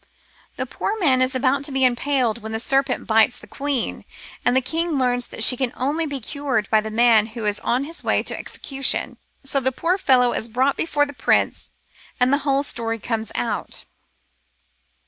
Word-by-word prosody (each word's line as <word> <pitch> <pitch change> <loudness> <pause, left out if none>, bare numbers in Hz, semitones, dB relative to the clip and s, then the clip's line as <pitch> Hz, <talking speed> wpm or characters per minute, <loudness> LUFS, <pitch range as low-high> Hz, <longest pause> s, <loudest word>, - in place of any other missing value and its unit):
The - - -3
poor 425 - -3
man 275 -10 +3
is 255 +1 +1
about 265 +2 +1
to 285 - +1
be 265 -1 +2
impaled 250 -2 +1
when 220 +1 -6
the 220 - -1
serpent 270 +2 +1
bites 225 +2 +3
the - - -12
queen; 280 -3 -3 0.4
and 245 +1 +3
the - - +7
king 325 +5 -1
learns 245 -2 0
that 220 - -2
she 250 - +7
can 250 -1 -1
only 300 +5 -1
be 285 -2 -4
cured 265 -4 -2
by 220 -1 +4
the 220 - -5
man 225 -1 +4
who 225 - -3
is 205 0 0
on 250 +3 0
his 325 +4 -7
way - - +1
to - - -3
execution. 275 -1 -2 0.3
So 275 0 +1
the 260 0 +1
poor 350 +9 -1
fellow 250 -7 +4
is 230 - -3
brought 260 +5 +1
before 290 -3 +1
the 285 - -9
prince - - 0 0.5
and 250 +2 +3
the 285 - +3
whole 275 -1 +1
story 230 -4 -2
comes 225 0 -3
out. - - -2
255 Hz, 195 wpm, -22 LUFS, 235-280 Hz, 0.5 s, the